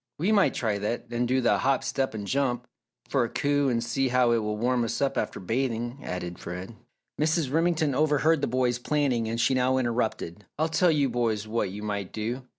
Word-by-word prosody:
"We 180 +8 +1
might 205 -3 +4
try 105 -4 0
that 105 +4 -3
and 120 +1 0
do 130 +1 +2
the 105 -5 +3
'Hop, 135 -1 +1
step, 135 -4 -1
and 105 -2 -4
jump,' 125 0 0 0.4
for 135 -3 +2
a 115 - -2
coup 145 +1 +1
and 115 -2 0
see 130 +3 0
how 125 -1 +3
it 115 - +3
will 105 -1 -2
warm 120 +2 +1
us 115 - -2
up 140 - +1
after 105 - -2
bathing," 120 +4 -2
added 90 -1 -5
Fred. 90 +5 -7 0.5
Mrs. 155 -3 +1
Remington 160 -3 +2
overheard 155 +2 +3
the - - +1
boys 125 0 +1
planning 125 -5 0
and 115 +1 -2
she 120 +3 +3
now 130 0 +2
interrupted. 115 -6 -2
"I'll 160 +2 +1
tell 175 +2 +3
you 145 -4 +3
boys 115 -4 -1
what 110 -2 -1
you 105 +3 -7
might 100 -3 -3
do! 115 +4 -3
120 Hz, 210 wpm, -27 LUFS, 110-140 Hz, 0.5 s, might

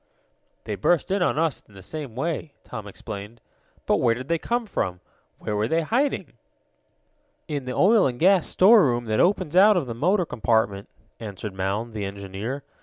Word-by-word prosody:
"They 105 - -4
burst 160 - +1
in 195 0 +1
on 175 - +1
us 160 -3 0
in 100 - -20
the 95 - -12
same 145 - -7
way," 155 +1 -3
Tom 110 -4 -8
explained. 105 +2 -8 0.5
"But - - +2
where 115 - +2
did 130 +3 -8
they 170 -1 +1
come 240 +5 -1
from? 90 - -3 0.4
Where 105 - -4
were 105 +1 0
they 165 +6 +1
hiding?" 260 - -1 1.1
"In 145 -5 -4
the 125 - -4
oil 205 0 +5
and 125 -2 -4
gasoline 185 +2 +5
storeroom 180 - +5
that 110 -1 0
opens 175 -4 +1
out 205 +2 +7
of 165 - 0
the 120 - -5
motor 180 - +1
compartment," 110 -5 0 0.3
answered 105 -2 -7
Mound, 100 +5 -3
the 105 -2 -3
engineer. 100 +7 -5
125 Hz, 180 wpm, -24 LUFS, 105-175 Hz, 1.1 s, out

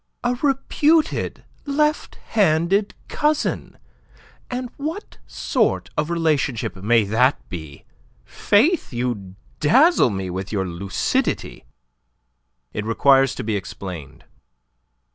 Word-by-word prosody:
"A 245 +1 +1
reputed 295 +3 +1 0.2
left 300 +2 0 0.2
handed 195 0 +2
cousin! 300 0 -1 0.7
And 250 -1 -4
what 320 +8 -6
sort - - -1
of 155 - -1
relationship 155 -10 0
may 110 +4 +2
that 115 +7 +2
be? 80 -7 -8 0.4
Faith, 295 - +2
you 120 -7 -3 0.2
dazzle 265 - +5
me 95 -3 -4
with 95 +2 -5
your 95 -3 -1
lucidity." 90 -6 -2 1.1
"It 105 - -3
requires 135 +4 +3
to - - -5
be 110 0 -1
explained." 90 -6 -7
140 Hz, 100 wpm, -22 LUFS, -, 1.1 s, dazzle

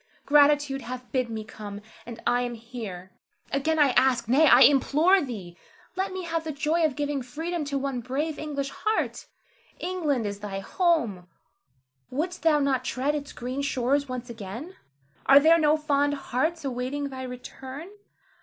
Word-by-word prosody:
Gratitude 290 -1 +4
hath 250 0 -7
bid 255 -3 0
me 220 -1 -4
come, 210 -1 -8 0.3
and 235 -1 -8
I 245 +1 +2
am 245 -1 -3
here. 220 -6 -8 0.4
Again 315 +4 +1
I 295 -2 +5
ask, 255 -2 +3
nay, 285 +7 +5
I - - +7
implore 305 +7 +5
thee, 205 - -6 0.4
let 380 +1 -1
me 375 0 -5
have 330 -1 -2
the 320 - -3
joy 305 +4 0
of 305 -4 +1
giving 290 -1 -2
freedom 320 +6 -4
to 280 -1 -2
one 270 -2 -2
brave 290 +6 -3
English 280 -2 -3
heart. 435 +7 -2 0.5
England 310 -10 -1
is 200 -1 -4
thy 205 -2 -5
home: 225 - 0 0.8
wouldst 345 +7 -3
thou 320 -2 +4
not 275 -3 +1
tread 260 +3 -1
its 285 -2 -4
green 255 +3 -4
shores 280 +1 0
once 250 -1 -5
again? 235 - -8 0.5
Are 275 +1 +9
there 325 +3 +5
no 305 0 +4
fond 290 -1 +1
hearts 300 +4 -2
awaiting 270 +2 -3
thy 260 -1 -7
return? 260 +4 -8
275 Hz, 165 wpm, -26 LUFS, 245-305 Hz, 0.8 s, Are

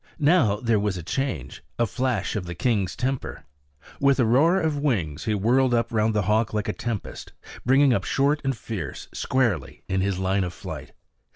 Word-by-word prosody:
Now 150 - +4
there 110 0 +1
was 100 -2 -1
a 85 - -6
change, 80 - -3
a 120 - +2
flash 120 -4 -1
of 95 -4 -3
the 85 - -5
king's 100 -3 0
temper. 130 +1 -3 0.5
With 140 -1 +3
a 125 - +4
roar 155 +11 +4
of 155 -4 0
wings 95 - -1
he 110 - +1
whirled 120 +5 +3 0.2
round 110 -1 +1
the 105 - +2
hawk 110 +2 +1
like 105 0 -1
a 105 - -1
tempest, 115 -5 -5 0.3
bringing 135 0 +5
up - - 0
short 145 +2 +1
and 135 -3 -1
fierce, 105 -6 -6
squarely 115 - -1
in 95 0 0
his 95 -1 0
line 95 +1 +1
of 90 -1 -4
flight. - - -8
115 Hz, 185 wpm, -25 LUFS, 95-135 Hz, 0.5 s, bringing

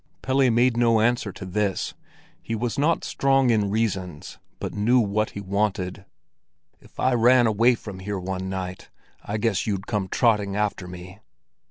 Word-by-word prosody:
Pelle 130 0 +3
made 120 +1 +3
no 115 -2 +4
answer 115 -2 +1
to 95 - -9
this; 100 +1 -1 0.5
he 115 - -4
was 120 +3 -2
not 160 +3 +2
strong 135 -2 +2
in 105 -3 +1
reasons, 95 -7 -3 0.2
but - - -4
knew 115 +5 +3
what 110 -1 0
he - - -3
wanted. 95 -1 -2 0.7
"If - - -20
I 130 - +2
ran 120 +1 +5
away 115 +3 +4
from 105 -4 -9
here 100 +1 -4
one 95 0 -4
night, 95 -1 -5 0.3
I 105 - -3
guess 110 -2 0
you'd 100 -2 -2
come 105 -5 -2
trotting 105 -2 +1
after 105 -3 -1
me." 90 +2 -10
105 Hz, 165 wpm, -24 LUFS, 95-120 Hz, 0.7 s, ran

